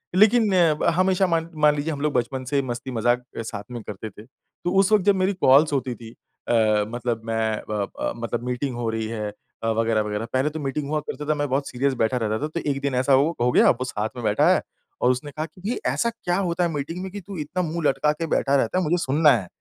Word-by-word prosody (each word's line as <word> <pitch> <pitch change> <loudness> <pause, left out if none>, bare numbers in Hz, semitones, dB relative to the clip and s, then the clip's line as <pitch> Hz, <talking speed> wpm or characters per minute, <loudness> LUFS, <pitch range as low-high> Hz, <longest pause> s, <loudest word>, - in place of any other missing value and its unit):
लेकिन 215 +2 +5 0.3
ब - - 0
हमेशा 185 +1 +3
मान 165 -1 0
मान 150 -1 +6
लीजिए 150 +2 -2
हम 140 - -6
लोग 150 -1 0
बचपन 130 +2 -1
से 140 +2 +1
मस्ती-मज़ाक 120 -1 -1
अ, - - -2
साथ 105 -2 -6
में 120 -2 -5
करते 105 +2 -7
थे। 105 +2 -14
तो 135 +7 -8
उस 195 +1 +3
वक़्त 210 -3 +4
जब 205 - +5
मेरी 190 +1 +1
कॉल्स 150 -4 +4
होती 130 -2 -1
थी 115 0 -11 0.4
अ, - - +1 0.4
मतलब 120 -1 -3
मैं 110 -1 -1
व 105 -1 -1 0.2
अ, - - -1
मतलब 120 0 -4
मीटिंग 125 +1 -2
हो 120 -1 -2
रही 110 0 -2
है 110 -2 -4 0.4
अ, 115 - 0
वग़ैरह-वग़ैरह। 110 -1 0
पहले 130 +3 +2
तो 155 - -6
मीटिंग 140 0 -3
हुआ 155 0 0
करते 150 0 -6
था, 155 - +3
मैं 145 0 -1
बहुत 140 +2 -1
सीरियस 135 +2 0
बैठा 120 +3 +1
रहता 110 -1 -1
था, - - 0
तो 155 +2 -4
एक 140 -1 -1
दिन 140 -2 -1
ऐसा 130 +2 +4
वो 150 +5 +2
हो 125 +1 +3
गया - - +5
अब - - +5
वो 130 - -2
साथ 110 -3 -3
में 120 - -6
बैठा 105 -1 +3
है - - +1 0.4
और 125 - +4
उसने 135 +3 -4
कहा 155 +2 -4
कि, 165 +3 -16
"ये 245 - -2
ऐसा 235 - +1
क्या 180 -6 -2
होता 180 -2 0
है 170 - +1
मीटिंग 155 +4 -4
में 190 - -6
कि 205 - -7
तू 195 0 -9
इतना 150 +4 -2
मुँह 165 -1 -1
लटका 135 +3 +2
के 160 +2 -3
बैठा 140 -2 +1
रहता 135 +6 +1
है, 185 - +2
मुझे 170 +2 +1
सुनना 150 +2 +4
है।" 110 -8 +1
135 Hz, 255 wpm, -24 LUFS, 120-165 Hz, 0.4 s, मान